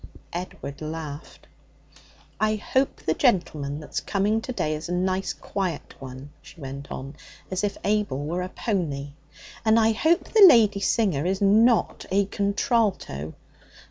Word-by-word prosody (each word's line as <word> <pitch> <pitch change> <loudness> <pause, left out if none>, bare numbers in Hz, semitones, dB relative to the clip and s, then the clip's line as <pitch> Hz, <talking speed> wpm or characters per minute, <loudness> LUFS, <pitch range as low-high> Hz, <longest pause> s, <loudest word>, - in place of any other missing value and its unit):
Edward 170 -5 -6
laughed. 155 -1 -7 0.9
'I 215 0 +2
hope 260 +5 -1
the - - +1
gentleman 155 - 0
that's 150 - -4
coming 210 +2 0
to 255 - -5
day 155 -10 -1
is 155 +2 -5
a - - -1
nice 185 +1 0
quiet 185 -6 -4
one,' 130 +2 -9
she 145 +2 -15
went 140 0 -7
on, 135 +3 -6 0.4
as 185 +1 -1
if 205 - -1
Abel 205 -9 0
were 175 +4 -2
a 180 - -4
pony. 155 - -2 0.5
'And 220 0 +4
I 225 0 +4
hope 320 +9 +2
the 435 -2 +6
lady 215 -7 +5
singer 190 -7 +1
is 190 +1 0
not 220 +4 +3
a 200 +1 +2
contralto. 200 - -1
190 Hz, 145 wpm, -25 LUFS, 150-215 Hz, 0.9 s, the